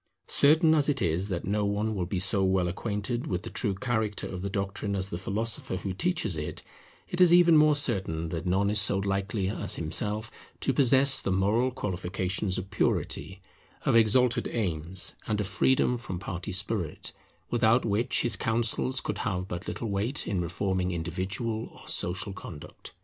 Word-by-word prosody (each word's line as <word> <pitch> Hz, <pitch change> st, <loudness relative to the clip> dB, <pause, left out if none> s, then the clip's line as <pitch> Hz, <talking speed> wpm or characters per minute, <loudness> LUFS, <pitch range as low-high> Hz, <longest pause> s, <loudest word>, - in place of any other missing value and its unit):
Certain 160 Hz, +3 st, +5 dB
as 150 Hz, -2 st, +3 dB
it 140 Hz, -2 st, +1 dB
is 90 Hz, 0 st, 0 dB
that 90 Hz, -3 st, -3 dB
no 105 Hz, +2 st, 0 dB
one 105 Hz, +2 st, 0 dB
will 90 Hz, -4 st, -2 dB
be 95 Hz, -, -2 dB
so 95 Hz, +2 st, +2 dB
well 95 Hz, -1 st, +2 dB
acquainted 105 Hz, +6 st, -3 dB
with 90 Hz, +1 st, -2 dB
the 115 Hz, -, -7 dB
true 100 Hz, -5 st, 0 dB
character 110 Hz, -1 st, -1 dB
of 90 Hz, -, -6 dB
the 100 Hz, -, -3 dB
doctrine 100 Hz, +1 st, -2 dB
as 95 Hz, 0 st, -2 dB
the 85 Hz, -, -4 dB
philosopher 105 Hz, +1 st, -2 dB
who 95 Hz, +1 st, -4 dB
teaches 115 Hz, -, 0 dB
it, 75 Hz, -, -5 dB, 0.4 s
it 180 Hz, -, -1 dB
is 180 Hz, -2 st, +7 dB
even 175 Hz, -1 st, +7 dB
more 150 Hz, -1 st, +6 dB
certain 95 Hz, -, 0 dB
that 80 Hz, +1 st, -4 dB
none 100 Hz, +3 st, +2 dB
is 105 Hz, -1 st, +4 dB
so 100 Hz, -2 st, +2 dB
likely 100 Hz, +1 st, -1 dB
as 105 Hz, -, 0 dB
himself 105 Hz, +7 st, -1 dB, 0.3 s
to -, -, 0 dB
possess 135 Hz, 0 st, +5 dB
the -, -, -1 dB
moral 105 Hz, +7 st, +2 dB
qualifications 95 Hz, -4 st, -2 dB
of 95 Hz, +2 st, -6 dB
purity, 100 Hz, -1 st, -1 dB, 0.4 s
of -, -, +3 dB
exalted 115 Hz, +2 st, +3 dB
aims, 90 Hz, -4 st, -1 dB
and 105 Hz, -1 st, 0 dB
of 105 Hz, -, 0 dB
freedom 125 Hz, +5 st, +2 dB
from 95 Hz, -6 st, -5 dB
party 95 Hz, +1 st, -5 dB
spirit, 100 Hz, -3 st, -3 dB, 0.4 s
without 115 Hz, +1 st, +3 dB
which 110 Hz, +3 st, +1 dB
his 120 Hz, -3 st, +1 dB
counsels 120 Hz, +4 st, 0 dB
could -, -, -4 dB
have 95 Hz, -5 st, -2 dB
but 90 Hz, +1 st, -6 dB
little 115 Hz, -3 st, -4 dB
weight 110 Hz, +8 st, -1 dB
in 95 Hz, -4 st, 0 dB
reforming 90 Hz, +1 st, -1 dB
individual 95 Hz, +6 st, -3 dB
or -, -, -15 dB
social 95 Hz, +3 st, -1 dB
conduct. 85 Hz, -5 st, -10 dB
100 Hz, 175 wpm, -28 LUFS, 95-115 Hz, 0.4 s, is